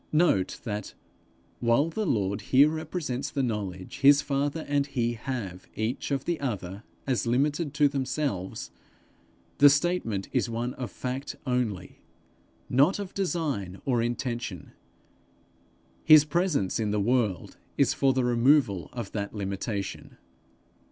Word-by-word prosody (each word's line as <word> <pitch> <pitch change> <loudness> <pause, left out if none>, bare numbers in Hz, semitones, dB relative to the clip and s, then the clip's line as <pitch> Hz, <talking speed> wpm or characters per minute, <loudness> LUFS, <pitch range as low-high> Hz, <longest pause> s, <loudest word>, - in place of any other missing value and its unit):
Note 155 - +2
that, 105 -3 -5 0.6
while 120 +6 +3
the 215 +3 -2
Lord 100 -6 0
here 140 +3 +5
represents 155 -4 -3
the 140 -2 -1
knowledge 100 -6 -4
his 140 +1 +7
father 145 +2 -1
and 145 -1 +1
he 120 -4 -1
have 110 -7 -5
each 110 +4 -2
of 140 -1 -1
the 170 -2 -1
other 100 -7 -4 0.2
as 125 -3 0
limited 145 +5 +1
to 145 -1 +5
themselves, 135 -8 -3 0.9
the 145 - +9
statement 145 - 0
is - - 0
one 120 +2 -2
of 125 -4 -5
fact 130 +7 -5
only, 120 -8 -2 0.7
not 140 +9 +3
of 200 -2 -6
design 150 - -2
or 125 -4 +2
intention: 120 - -3 1.3
his 155 -2 +8
presence 150 - 0
in 110 -2 0
the 105 0 0
world 110 -3 0 0.2
is - - +3
for 135 - +3
the 130 -1 +1
removal 120 - +3
of 120 -2 -5
that 100 0 -4
limitation. 100 0 -4
125 Hz, 130 wpm, -27 LUFS, 105-145 Hz, 1.3 s, the